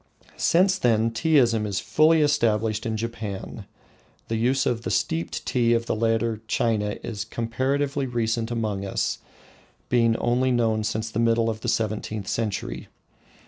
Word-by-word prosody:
Since 190 +2 +3
then 115 -3 +2
Teaism 115 -4 +2
is 100 -2 -1
fully 155 +1 +3
established 110 -5 +1
in 110 -1 -2
Japan. 110 -3 -5 0.6
The 115 - 0
use 125 +4 +1
of 115 -2 0
the - - -4
steeped 165 +1 -1
tea 120 -2 +2
of 115 0 -1
the - - -1
later 115 0 0
China 105 -3 0
is 105 -3 -4
comparatively 135 +5 -1
recent 115 -1 -1
among 110 -4 -2
us, 100 - -2 0.7
being 115 -2 +3
only 125 +2 +1
known 115 -3 +1
since 110 0 -2
the 110 - -2
middle 115 0 +2
of 110 0 -8
the - - -2
seventeenth 110 -2 -2
century. 100 - -3
115 Hz, 145 wpm, -25 LUFS, 110-120 Hz, 0.7 s, Since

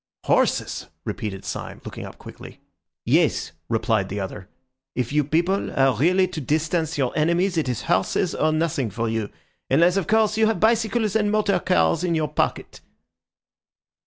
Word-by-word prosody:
"Horses!" - - +1 0.2
repeated 95 -3 -5
Syme, - - -6
looking - - -7
up - - -12
quickly. - - -12 0.5
"Yes," - - +2 0.2
replied 110 -3 0
the 100 - -4
other; 95 -1 -6 0.5
"if 125 +1 -2
you 150 0 +3
people 170 +7 0
are 135 -2 +4
really 180 - +3
to 165 -4 -5
distance 160 +3 -1
your 130 -3 -1
enemies 170 +5 +1
it 155 -5 0
is 125 - -3
horses 165 - +1
or 155 - +1
nothing 155 -6 0
for 115 +4 -3
you, 110 -2 -2 0.4
unless 170 +7 +4
of 195 - -1
course 215 0 +2
you 220 - +5
have 220 -4 0
bicycles 220 -1 +1
and 210 -2 +2
motor 205 -3 +2
cars 80 - +2
in 175 -2 +1
your 155 -2 0
pocket." - - -2
160 Hz, 160 wpm, -23 LUFS, 120-190 Hz, 0.5 s, you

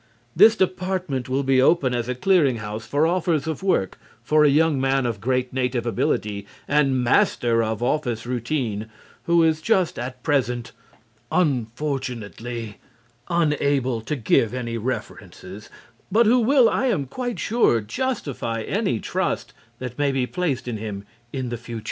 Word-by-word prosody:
This 215 +6 +7
department 185 - -1
will 135 +2 0
be 135 -1 +3
open 135 -2 +3
as 120 0 -2
a 125 - -1
clearing 150 -3 +3
house 105 0 -6
for 145 +2 +2
offers 170 -3 +1
of 160 0 -3
work 185 - 0 0.2
for 150 +4 +4
a 150 - +6
young 150 -1 +3
man 135 -1 +1
of 115 -4 -3
great 125 +1 -1
native 125 -2 -1
ability 105 -2 -1 0.2
and 135 -3 +2
master 120 -1 +2
of 110 +1 -2
office 120 -4 -1
routine 120 -3 -2 0.4
who 170 -1 +4
is 160 -1 +2
just 185 -2 +1
at 125 +1 -6
present, 125 -5 0 0.6
unfortunately, 120 - -2 0.5
unable 145 -7 +1
to 130 +7 -3
give 115 -1 +2
any 120 -2 -3
references, 105 -4 -6 0.4
but 230 +4 +4
who 240 +4 +5
will, 250 +1 +5
I 265 - +1
am 185 - 0
quite 245 - -4
sure, 220 - +2
justify 115 - -3
any - - -1
trust - - -2 0.2
that 125 0 -7
may 145 -1 +2
be 135 -2 0
placed 145 -5 -2
in 120 -3 -3
him 105 -2 -6 0.3
in 130 -2 -3
the 120 - -3
future. 115 0 -7
130 Hz, 155 wpm, -23 LUFS, 115-160 Hz, 0.6 s, This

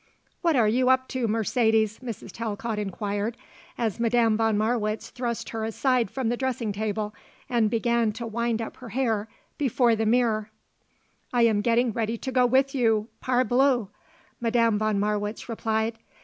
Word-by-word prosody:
"What 335 -3 +2
are 230 -4 +4
you 250 +4 +2
up 260 0 +3
to, 255 -3 -1
Mercedes?" 220 0 +1
Mrs. 235 -5 -7
Talcott 225 0 -3
inquired, 205 +2 -3 0.4
as 225 -4 -1
Madame 230 -1 +3
von 225 -1 +2
Marwitz 215 0 -1
thrust 240 -2 -3
her 225 -1 -4
aside 240 +1 +1
from 260 -1 -2
the 240 - +1
dressing 250 -4 -1
table 210 0 -2 0.3
and 235 -4 +2
began 235 0 +1
to 235 +1 -6
wind 230 0 -1
up - - -8
her 250 -2 -10
hair 225 -3 0 0.3
before 245 -4 +3
the 220 0 0
mirror. 220 -2 +2 0.8
"I 245 -1 +3
am 220 -3 +3
getting 235 +2 +2
ready 225 +1 -2
to 260 - -5
go 250 -1 +4
with 265 +2 +2
you, 225 -4 +1
parbleu!" 250 -2 +2 0.5
Madame 230 -2 +2
von 215 -2 +1
Marwitz 210 +1 -2
replied. 225 -1 -1
230 Hz, 160 wpm, -26 LUFS, 215-245 Hz, 0.8 s, are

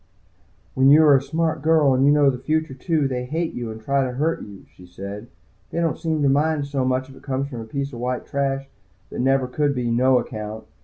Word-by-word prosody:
"When 130 +1 +4
you 155 +3 +7
are 145 -2 +7
a 135 - +3
smart 160 +2 -1
girl, 155 -3 +4
and 130 +1 +2
you - - +6
know 145 -2 +4
the 125 - -6
future, 155 +2 -1
too, 150 +2 0
they 125 -1 -3
hate 160 +5 -2
you 120 -2 -5
and 110 0 -7
try 140 +4 0
to 125 -1 -3
hurt 155 +6 -1
you," 100 -2 -11
she 90 - -15
said. 100 +5 -8 0.4
"They - - -3
don't 165 -2 0
seem 160 -3 -1
to - - +4
mind 150 +2 +2
it - - -6
so 140 -2 -1
much 130 0 0
if 135 - -14
it - - -15
comes 135 0 -3
from 120 -5 -6
a - - -7
piece 140 +4 -4
of 120 - -7
white 125 +1 -3
trash 135 -1 -2 0.4
that - - -6
never 135 0 +2
could 140 +3 -1
be 120 -2 -1
'no 130 +2 +4
account.' 110 -2 -5
135 Hz, 250 wpm, -22 LUFS, 125-150 Hz, 0.4 s, you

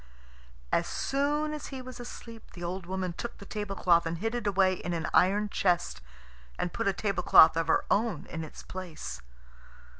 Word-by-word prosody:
As - - +2
soon 295 +2 0
as 300 - -6
he 270 - -6
was 255 0 -9
asleep 230 -1 -10
the 175 - -8
old 175 +1 -4
woman 185 -1 -2
took 235 +7 -6
the 200 - -11
tablecloth 195 -5 +1
and 165 +1 -2
hid 225 +6 -2
it 240 -3 -2
away 190 -1 +3
in 175 -1 -4
an 165 -1 -2
iron 205 +3 +4
chest, 175 - 0 0.6
and 175 - -2
put - - -1
a - - +5
tablecloth 185 -5 +5
of 165 -1 0
her - - +2
own 225 +2 +1
in 160 -1 -4
its 155 - -10
place. 155 - -7
190 Hz, 180 wpm, -29 LUFS, 170-225 Hz, 0.6 s, a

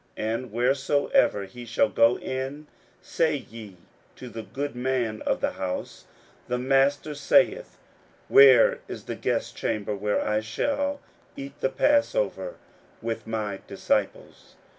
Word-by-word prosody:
41:014:014 110 +1 -1
And 115 0 -5
wheresoever 135 - +2
he 120 +6 -11
shall 115 - +1
go 115 +2 +4
in, 135 +3 -5 0.4
say 160 -2 +1
ye 110 -7 -9 0.4
to 125 - -9
the 115 -1 -7
goodman 125 -3 -3
of - - 0
the - - +1
house, 95 -1 -5 0.4
The 125 - -1
Master 135 +3 +2
saith, 285 - +2 0.5
Where 475 +4 +7
is - - -7
the - - -5
guestchamber, 105 -1 -2
where 105 +1 0
I 105 0 +1
shall 285 - -2 0.4
eat 140 +1 -9
the 135 - +2
passover - - +1 0.5
with 115 -1 -4
my 105 -3 -3
disciples? - - -3
130 Hz, 125 wpm, -26 LUFS, 110-150 Hz, 0.5 s, Where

